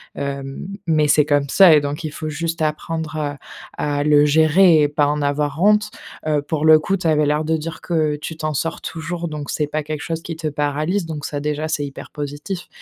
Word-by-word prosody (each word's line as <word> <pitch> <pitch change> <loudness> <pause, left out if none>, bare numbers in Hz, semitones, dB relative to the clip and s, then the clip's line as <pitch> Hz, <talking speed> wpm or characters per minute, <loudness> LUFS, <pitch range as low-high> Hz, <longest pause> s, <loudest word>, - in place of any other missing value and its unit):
hem, 140 +3 -5 0.2
mais 155 -2 +3
c'est 150 0 +5
comme 145 -2 +1
ça 185 -2 +7
et 150 - +4
donc, 145 +3 -4
il 150 - -4
faut 155 0 -5
juste 165 +2 -3
apprendre, 155 0 -2
heu, 145 -1 -2 0.4
à 145 -1 -1
le 150 0 +5
gérer 160 +2 +5
et 145 - +3
pas 145 0 +1
en 150 0 -1
avoir 145 +2 -1
honte. 210 +1 +4 0.4
Heu, 150 -2 +2
pour 150 +1 -3
le 155 0 +8
coup, 195 +5 0
tu 180 -3 -2
avais 150 -1 +3
l'air 150 +2 +1
de 160 +1 0
dire 160 +1 -6
que 155 -3 0
tu 160 +2 -7
t'en 155 -1 -2
sors 165 +4 -3
toujours, 165 +1 -5
donc 150 -2 -6
c'est 150 -1 -1
pas 155 +1 -3
quelque 155 0 -5
chose 165 -1 -3
qui 165 -1 -6
te 160 -1 -3
paralyse. 150 +6 -1
Donc 155 -3 -6
ça 145 - -3
déjà, 150 +1 -2
c'est 145 -2 -1
hyper 140 - -9
positif. 150 +5 -6
155 Hz, 225 wpm, -20 LUFS, 145-160 Hz, 0.4 s, le